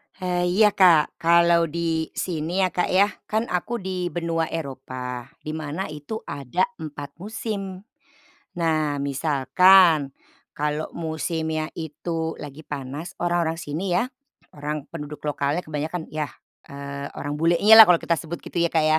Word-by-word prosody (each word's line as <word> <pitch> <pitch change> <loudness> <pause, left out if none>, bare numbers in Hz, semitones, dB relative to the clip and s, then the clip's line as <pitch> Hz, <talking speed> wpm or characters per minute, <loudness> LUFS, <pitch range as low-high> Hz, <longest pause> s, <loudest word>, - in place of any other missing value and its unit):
He 180 -1 -1
iya, 210 -1 +6
Kak. 175 -6 +4
Kalau 170 0 +4
di 165 0 -1
sini 175 +2 -1
ya 185 - +2
Kak 180 - 0
ya, 195 +2 +5 0.2
kan 220 +1 0
aku 180 +7 -1
di 185 -1 -3
benua 165 -2 -1
Eropa 130 -4 -5 0.2
di 155 - -4
mana 155 +3 -4
itu 150 +10 -6
ada 140 +7 -2 0.2
4 145 -1 -8
musim. 200 -2 -5 0.8
Nah, 155 -3 +1
misalkan, 155 +3 +4 0.4
kalau 150 +1 -2
musimnya 160 -1 -2
itu 160 +1 -4
lagi 150 +1 -9
panas, 145 +4 -6
orang-orang 170 -2 0
sini 175 +4 -3
ya, 230 +8 +1 0.5
orang 150 0 -4
penduduk 150 -2 -7
lokalnya 150 +2 -1
kebanyakan 155 +2 -4
yah, 150 -3 -3 0.4
eee, 140 0 -7
orang 145 0 -3
bulenyalah, 205 +7 +8
kalau 175 -2 +5
kita 170 - +1
sebut 170 +1 -6
gitu - - -5
ya 170 0 +2
Kak 160 - +3
ya, 155 0 +4
160 Hz, 140 wpm, -24 LUFS, 150-175 Hz, 0.8 s, bulenyalah